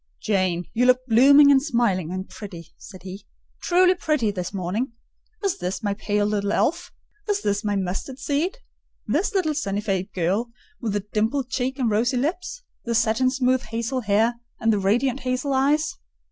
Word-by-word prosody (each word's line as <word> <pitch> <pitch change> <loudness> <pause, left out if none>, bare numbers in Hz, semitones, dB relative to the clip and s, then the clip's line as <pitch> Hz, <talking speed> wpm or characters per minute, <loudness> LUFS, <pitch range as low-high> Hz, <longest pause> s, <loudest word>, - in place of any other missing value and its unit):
"Jane, 185 -4 0
you 250 +2 +2
look 255 0 +3
blooming, 280 +5 +7
and 270 -1 +5
smiling, 235 - 0
and 185 +1 -4
pretty," 175 -6 -10
said 185 -4 -12
he: 195 +2 -9 0.3
"truly 365 +1 +4
pretty 305 - 0
this 180 -3 -4
morning. 205 +6 -3 0.5
Is 395 -3 0
this 180 +2 -3
my 205 -1 0
pale, 205 0 -1
little 205 -1 0
elf? 335 - 0 0.4
Is 410 0 0
this 205 +1 0
my 205 -1 0
mustard 195 +7 -3
seed? 310 - -1 0.5
This 410 +2 0
little 335 -5 +1
sunny 200 -9 -2
faced 195 -3 -2
girl 190 +7 0 0.3
with 225 -4 -2
the 205 -1 -2
dimpled 235 +5 0
cheek 265 0 -1
and 255 -3 0
rosy 240 +5 +1
lips; 360 - -3 0.2
the 235 -1 -2
satin 230 +3 +2
smooth 255 -1 +1
hazel 230 +2 -3
hair, 225 +3 +1 0.2
and 225 -2 +2
the 205 - +1
radiant 240 +7 +1
hazel 255 +2 -1
eyes?" 285 +4 +1
235 Hz, 175 wpm, -23 LUFS, 200-270 Hz, 0.5 s, blooming